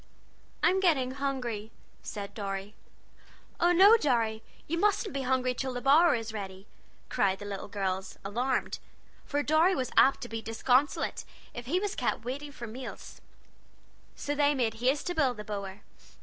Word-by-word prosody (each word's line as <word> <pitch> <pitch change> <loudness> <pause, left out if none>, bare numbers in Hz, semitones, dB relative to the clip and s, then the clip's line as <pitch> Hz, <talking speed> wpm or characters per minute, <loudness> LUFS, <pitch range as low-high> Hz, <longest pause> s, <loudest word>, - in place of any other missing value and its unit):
"I'm 380 - +4
getting 295 -9 +2
hungry," 255 -6 -3 0.3
said 200 -1 -6
Dorry. 200 -1 -4 0.9
"Oh, 345 +1 +4
no, 395 +6 +8
Dorry, 230 - +1 0.2
you 335 +2 -2
mustn't 410 +1 +1
be 275 - -2
hungry 255 -1 +1
till 260 +1 -3
the 245 - -3
bower 295 +5 +5
is 225 -1 -4
ready!" 195 -2 -6 0.4
cried 195 -1 +1
the 205 - -9
little 200 -1 -5
girls, 190 -2 -3
alarmed, 245 +6 -1 0.5
for 290 0 -1
Dorry 320 +6 +4
was 255 -2 -2
apt 270 - +5
to 245 - -5
be 225 -1 -5
disconsolate 250 +5 +1 0.3
if 240 0 -7
he 350 +7 +1
was 410 0 -2
kept - - -2
waiting 285 +4 -5
for 240 - -8
his 220 - -9
meals. 255 +1 -9 0.9
So 290 - -3
they 290 0 +3
made 235 -4 +1
haste 255 +5 0
to 355 - -1
build 270 -8 +1
the 210 - -6
bower. 200 -1 -6
255 Hz, 165 wpm, -29 LUFS, 215-290 Hz, 0.9 s, no